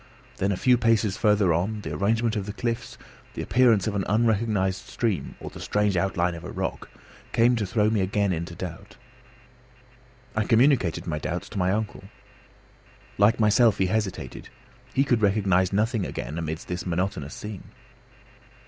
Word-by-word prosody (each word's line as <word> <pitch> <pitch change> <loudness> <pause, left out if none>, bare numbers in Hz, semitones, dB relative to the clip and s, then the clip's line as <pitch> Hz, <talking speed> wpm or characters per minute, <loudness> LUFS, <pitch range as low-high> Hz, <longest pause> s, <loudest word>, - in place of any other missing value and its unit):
Then 100 +1 0
a 95 - -1
few 125 +2 +3
paces 110 -4 +2
farther 105 -5 +3
on, 100 +6 -1
the 80 -5 -5
arrangement 110 +7 +1
of 100 -2 -3
the 105 - -4
cliffs, 115 0 -3 0.4
the - - -3
appearance 115 -3 +4
of 110 - -1
an 100 -1 -1
unrecognised 105 -3 +1
stream, 100 - -2
or - - -8
the - - -10
strange 105 -2 0
outline 90 -1 +1
of 85 - -8
a - - -7
rock, - - -4 0.4
came 120 +2 +4
to 105 -3 -1
throw 105 +1 +2
me 110 -3 +1
again 100 0 +1
into 85 +1 -5
doubt. 90 +5 -8 1.4
I 110 -1 +1
communicated 115 - +3
my 75 -3 -2
doubts 90 +3 -4
to 105 - -5
my 90 0 +2
uncle. 105 -1 -3 1.1
Like 105 +3 +4
myself, 105 0 +4
he 95 - +2
hesitated; 105 0 -3 0.4
he 135 - +2
could 120 -5 +1
recognise 95 -3 +2
nothing 110 +1 +1
again 80 -2 -5
amidst 80 0 -5
this 90 0 -4
monotonous 90 -5 -2
scene. 105 -2 -8
100 Hz, 165 wpm, -25 LUFS, 90-110 Hz, 1.4 s, appearance